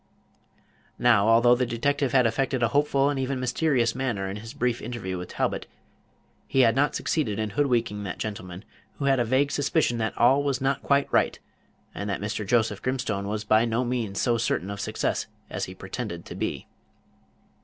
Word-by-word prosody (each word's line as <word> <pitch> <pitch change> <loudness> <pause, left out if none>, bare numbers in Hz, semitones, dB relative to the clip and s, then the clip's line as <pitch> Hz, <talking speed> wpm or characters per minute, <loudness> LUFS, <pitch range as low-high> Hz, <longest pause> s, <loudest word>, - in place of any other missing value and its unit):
Now, 115 -4 +4
although 115 +2 +6
the 125 0 +1
detective 140 +3 0
had 130 -2 +4
affected 130 +2 0
a 115 - +3
hopeful 140 -1 +2
and 140 - -2
even 130 0 -1
mysterious 125 -1 +1
manner 120 -7 -2
in 95 +2 -5
his 110 +2 -9
brief 120 -1 0
interview 110 -6 -4
with 90 - -7
Talbot, - - -2 0.8
he 135 - +3
had 115 -2 +4
not 145 +2 +2
succeeded 115 -11 -1
in 110 -1 -2
hoodwinking 120 -6 0
that 95 - -5
gentleman, 95 -3 -6 0.3
who 140 - -5
had 135 -1 +3
a - - +3
vague 130 +5 +1
suspicion 145 -4 +1
that 110 -1 -2
all 130 +4 +5
was 140 -3 0
not 135 0 0
quite 140 0 +2
right, - - +2 0.6
and 100 - -4
that 100 - -2
Mr. 105 +1 -3
Joseph 110 -2 +1
Grimstone 120 -6 -2
was 105 +1 -3
by 110 +1 +4
no 120 +2 0
means 120 -5 -2
so 120 -2 +2
certain 100 -4 -1
of 100 - -5
success - - -2 0.2
as - - -2
he - - -10
pretended 85 -1 -6
to - - -8
be. - - -3
120 Hz, 185 wpm, -26 LUFS, 105-135 Hz, 0.8 s, although